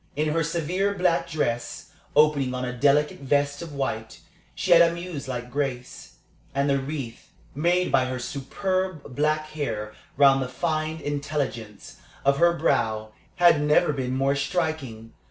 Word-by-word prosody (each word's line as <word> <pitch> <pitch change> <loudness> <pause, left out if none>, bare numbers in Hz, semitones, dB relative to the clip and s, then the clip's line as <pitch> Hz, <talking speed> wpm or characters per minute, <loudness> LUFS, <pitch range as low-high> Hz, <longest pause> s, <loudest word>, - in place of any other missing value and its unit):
In 155 +2 0
her 165 +2 +1
severe 175 +5 -1
black 180 -2 +1
dress, 120 -7 -3 0.2
opening 145 -4 +3
on 125 0 -3
a 125 - -4
delicate 145 +3 +2
vest 140 +1 0
of 170 -2 -7
white, 110 -5 -3 0.4
she - - -2
had 170 -1 +9
a 170 - +6
muselike 140 -8 -6
grace; 135 -3 -4 0.4
and 140 +1 +1
the 140 -1 +2
wreath 135 -4 -6 0.2
made 175 +5 +1
by 130 -1 +3
her 130 0 -3
superb 185 +4 -3
black 155 +1 0
hair 115 -9 -4 0.2
round 135 -1 +6
the 130 - -3
fine 155 +2 -2
intelligence 140 -7 -4 0.3
of 140 0 +3
her 170 0 +5
brow 110 -9 0 0.2
had 175 -5 +5
never 150 0 +3
been 130 -2 -2
more 135 +1 +2
striking. 140 - -3
145 Hz, 150 wpm, -25 LUFS, 130-160 Hz, 0.4 s, had